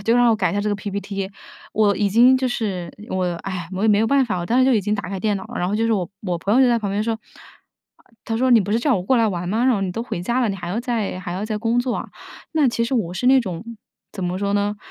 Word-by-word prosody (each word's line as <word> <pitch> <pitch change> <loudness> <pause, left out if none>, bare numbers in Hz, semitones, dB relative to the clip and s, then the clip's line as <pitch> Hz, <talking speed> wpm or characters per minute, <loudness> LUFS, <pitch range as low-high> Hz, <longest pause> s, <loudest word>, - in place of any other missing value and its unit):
就 230 +3 +3
让 245 -1 +5
我 - - +4
改 195 -4 +1
一 - - -4
下 205 - +1
这 210 - -1
个 - - +1
PPT。 200 -1 -4 0.4
我 210 -2 +3
已 205 0 +1
经 240 +6 +6
就 260 -1 0
是 190 -8 -3 0.2
我， 185 -1 0 0.2
唉， 180 -3 -5
我 190 +1 -3
也 220 - +3
没 205 -1 +5
有 225 - +2
办 275 +1 +3
法， 205 -6 -2
我 175 - -4
当 240 - +2
时 260 - +5
就 265 - +4
已 220 - +3
经 210 +2 -1
打 200 -2 -4
开 190 -2 -4
电 210 -1 +1
脑 190 - -7
了。 - - -7
然 180 - 0
后 205 - 0
就 225 - +1
是 230 - +2
我 185 -5 -1
我 180 -4 -2
朋 200 +5 0
友 260 - +5
就 - - +5
在 235 -1 +3
旁 205 -3 -3
边 205 +2 0
说， 230 - 0 0.8
啊 - - -28 0.2
她 225 - -2
说： 255 +3 +2
“你 235 -3 +7
不 200 +1 -2
是 225 - +3
叫 265 +2 +2
我 180 - -3
过 255 +7 +2
来 225 -1 +3
玩 180 -2 -3
吗？ 225 +5 +1
然 255 -2 +4
后 200 - -1
你 185 -2 -2
都 230 - -3
回 175 -7 -5
家 240 +7 0
了， 235 - +2
你 195 - -2
还 175 -1 -6
要 210 +7 -1
再 230 -7 -2
还 180 -2 -5
要 190 +3 -3
再 215 -1 -3
工 230 +2 +1
作 245 0 0
啊。” - - -5 0.4
那 305 -4 +3
其 235 -1 0
实 250 - -2
我 185 -8 0
是 245 - -2
那 265 +1 +7
种 185 -4 -5 0.5
怎 190 -3 -4
么 180 +1 -2
说 200 0 -1
呢， 205 +1 0
210 Hz, 355 characters per minute, -21 LUFS, 190-235 Hz, 0.8 s, 你